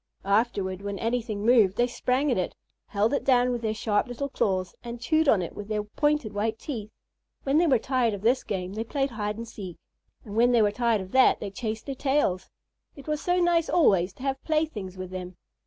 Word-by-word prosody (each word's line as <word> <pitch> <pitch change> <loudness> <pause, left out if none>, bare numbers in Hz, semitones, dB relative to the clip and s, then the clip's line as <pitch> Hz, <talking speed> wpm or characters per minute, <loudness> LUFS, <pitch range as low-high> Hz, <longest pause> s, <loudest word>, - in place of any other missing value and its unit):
Afterward, 200 -3 0
when 200 0 -4
anything 225 -2 -2
moved, 220 -5 +4
they 240 - +4
sprang 255 +3 0
at 240 - +1
it, 180 - -3 0.3
held 210 +5 +1
it 280 - 0
down 250 -1 +3
with 240 -1 -2
their 220 -1 -1
sharp 215 +2 0
little 260 +3 -4
claws, 185 -7 -1
and 240 0 -6
chewed 315 +4 +2
on 195 -7 +4
it 170 - -6
with 205 - -7
their 210 -1 -1
pointed 295 +1 0
white 220 +2 -1
teeth. 225 -6 -6 0.5
When 280 +3 +3
they 345 - +3
were 265 -4 +5
tired 240 -2 0
of 200 - -10
this 245 +3 +3
game, 185 -2 -4
they 220 +2 -3
played 270 +3 -1
hide 210 -2 -3
and 230 0 -6
seek, 190 -6 -8 0.5
and 205 -2 -8
when 240 +2 +4
they 235 - +5
were 205 - +3
tired 230 -1 +1
of 190 0 -9
that 260 0 +5
they 200 - -5
chased 220 +1 -4
their 275 - -3
tails. 265 -9 0 0.5
It 280 - -13
was 300 0 -1
so 355 0 +1
nice 345 -2 +2
always 195 - +3
to 260 - -12
have 270 -1 -2
playthings 300 - -2
with 185 0 -6
them. 185 -1 -7
225 Hz, 220 wpm, -26 LUFS, 205-265 Hz, 0.5 s, were